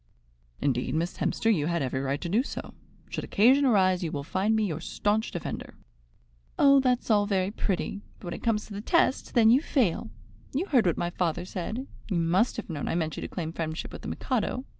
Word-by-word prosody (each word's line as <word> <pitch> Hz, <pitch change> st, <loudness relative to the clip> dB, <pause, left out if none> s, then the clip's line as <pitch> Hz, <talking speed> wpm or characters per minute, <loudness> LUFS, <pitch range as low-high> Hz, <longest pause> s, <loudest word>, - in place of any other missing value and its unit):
"Indeed, 130 Hz, -1 st, 0 dB
Miss 170 Hz, +3 st, -1 dB
Hemster, 225 Hz, 0 st, +2 dB
you 155 Hz, -6 st, 0 dB
had 170 Hz, -3 st, 0 dB
every 130 Hz, 0 st, -2 dB
right 140 Hz, +1 st, -1 dB
to -, -, -3 dB
do 205 Hz, +8 st, +3 dB
so. 270 Hz, -, -7 dB, 0.4 s
Should -, -, -3 dB
occasion 260 Hz, +7 st, +4 dB
arise, 185 Hz, -7 st, +3 dB
you 165 Hz, -, -2 dB
will 140 Hz, -, -3 dB
find 195 Hz, +8 st, +1 dB
me 220 Hz, -1 st, +2 dB
your 160 Hz, -5 st, -3 dB
staunch 210 Hz, +5 st, 0 dB
defender." 175 Hz, -, -6 dB, 0.8 s
"Oh, 275 Hz, -1 st, +6 dB
that's 250 Hz, -3 st, +1 dB
all 205 Hz, -1 st, +4 dB
very 195 Hz, -1 st, +1 dB
pretty; 200 Hz, -1 st, -2 dB, 0.2 s
but -, -, -13 dB
when 175 Hz, -, -4 dB
it -, -, -7 dB
comes 220 Hz, -2 st, 0 dB
to 210 Hz, -, -10 dB
the 200 Hz, -, -5 dB
test, 275 Hz, +2 st, +1 dB
then 225 Hz, -2 st, +6 dB
you 260 Hz, +4 st, +5 dB
fail. 245 Hz, -, 0 dB, 0.5 s
You 320 Hz, +7 st, +1 dB
heard 255 Hz, -, +3 dB
what 170 Hz, -, +1 dB
my 175 Hz, -, -1 dB
father 175 Hz, 0 st, -1 dB
said. 210 Hz, +8 st, -4 dB, 0.2 s
You 190 Hz, -, 0 dB
must 180 Hz, +9 st, +2 dB
have 230 Hz, -, -5 dB
known 155 Hz, -5 st, -4 dB
I -, -, -1 dB
meant 160 Hz, -3 st, -1 dB
you -, -, -6 dB
to -, -, -4 dB
claim 165 Hz, -3 st, -5 dB
friendship 160 Hz, -1 st, -4 dB
with -, -, -8 dB
the -, -, -7 dB
Mikado. 255 Hz, +1 st, -2 dB
195 Hz, 220 wpm, -28 LUFS, 170-230 Hz, 0.8 s, Oh